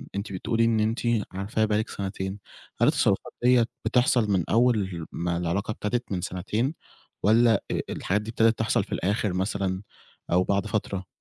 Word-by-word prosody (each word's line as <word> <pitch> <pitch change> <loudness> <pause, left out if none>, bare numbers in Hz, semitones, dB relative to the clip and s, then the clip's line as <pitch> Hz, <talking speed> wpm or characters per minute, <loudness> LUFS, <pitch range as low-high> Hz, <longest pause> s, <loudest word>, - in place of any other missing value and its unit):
أنتِ 100 0 -4
بتقولي 115 +5 +1
إن 115 -1 +2
أنتِ 110 +2 +1 0.3
عارفاه 100 +3 -1
بقى 105 -1 +1
لِك 110 - -2
سَنتين، 95 0 -4 0.4
هل - - +6
التصرفات - - +1
دِيّة 125 -2 +5 0.2
بتحصل 120 -2 +3
من 90 -4 +2
أول 105 -8 +2
ما 85 0 -2
العلاقة 90 +5 -1
ابتدت 120 +3 -3
من 90 -2 -1
سَنتين، 105 - -2 0.5
والّا 110 0 +4
آآ - - 0
الحاجات 105 +3 -1
دي 110 - -8
ابتدت 115 0 +3
تحصل 110 - +2
في - - -16
الآخِر 100 0 0
مثلًا 95 0 -1 0.5
أو 90 +1 +4
بعد 100 +1 0
فترة؟ 100 -3 -2
105 Hz, 165 wpm, -26 LUFS, 95-115 Hz, 0.5 s, هل